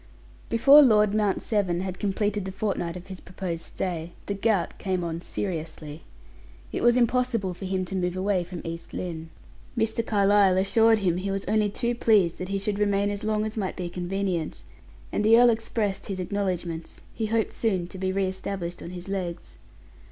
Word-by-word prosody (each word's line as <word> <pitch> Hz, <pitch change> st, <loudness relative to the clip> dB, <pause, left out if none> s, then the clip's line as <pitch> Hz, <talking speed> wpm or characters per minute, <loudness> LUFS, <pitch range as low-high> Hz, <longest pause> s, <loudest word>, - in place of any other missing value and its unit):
Before 275 Hz, +6 st, +8 dB
Lord 210 Hz, -6 st, +5 dB
Mount 210 Hz, -2 st, +1 dB
Severn 190 Hz, -5 st, 0 dB
had 185 Hz, -1 st, -4 dB
completed 205 Hz, 0 st, -1 dB
the 190 Hz, -, -4 dB
fortnight 190 Hz, -3 st, -2 dB
of 180 Hz, -, -10 dB
his 190 Hz, -2 st, -8 dB
proposed 180 Hz, -3 st, -5 dB
stay, 170 Hz, -2 st, -4 dB
the 200 Hz, -, -2 dB
gout 200 Hz, -3 st, 0 dB
came 185 Hz, -2 st, -1 dB
on 165 Hz, 0 st, -3 dB
seriously. 160 Hz, -5 st, -5 dB, 0.7 s
It -, -, -3 dB
was 240 Hz, +1 st, +5 dB
impossible 240 Hz, -5 st, +1 dB
for 190 Hz, -, -8 dB
him 185 Hz, 0 st, -1 dB
to 190 Hz, -, -5 dB
move 180 Hz, -1 st, -1 dB
away 190 Hz, -1 st, +1 dB
from 175 Hz, 0 st, -8 dB
East 165 Hz, 0 st, -6 dB
Lynne. 165 Hz, -2 st, -5 dB, 0.5 s
Mr. 225 Hz, 0 st, +1 dB
Carlyle 200 Hz, -3 st, +4 dB
assured 225 Hz, +4 st, +4 dB
him 180 Hz, -4 st, +1 dB
he 190 Hz, +2 st, -3 dB
was 195 Hz, 0 st, -2 dB
only 210 Hz, +1 st, +2 dB
too 235 Hz, +4 st, -1 dB
pleased 210 Hz, -7 st, +3 dB
that 185 Hz, -, -4 dB
he 200 Hz, -, 0 dB
should 200 Hz, +1 st, -2 dB
remain 205 Hz, 0 st, +2 dB
as 205 Hz, +1 st, -4 dB
long 215 Hz, 0 st, 0 dB
as 215 Hz, +1 st, -5 dB
might 195 Hz, -3 st, -2 dB
be 180 Hz, -1 st, -3 dB
convenient, 180 Hz, -2 st, -3 dB, 0.5 s
and 210 Hz, -, 0 dB
the 225 Hz, +2 st, +7 dB
earl 245 Hz, -1 st, +7 dB
expressed 220 Hz, -3 st, -2 dB
his 195 Hz, -3 st, -4 dB
acknowledgments; 180 Hz, -4 st, -3 dB
he 220 Hz, -, -2 dB
hoped 225 Hz, 0 st, 0 dB
soon 190 Hz, -6 st, 0 dB
to 190 Hz, -, -9 dB
be 190 Hz, 0 st, 0 dB
re 195 Hz, 0 st, +1 dB
established 190 Hz, -2 st, -4 dB
on -, -, -7 dB
his 180 Hz, 0 st, -8 dB
legs. 185 Hz, -3 st, -4 dB
195 Hz, 190 wpm, -26 LUFS, 180-210 Hz, 0.7 s, Before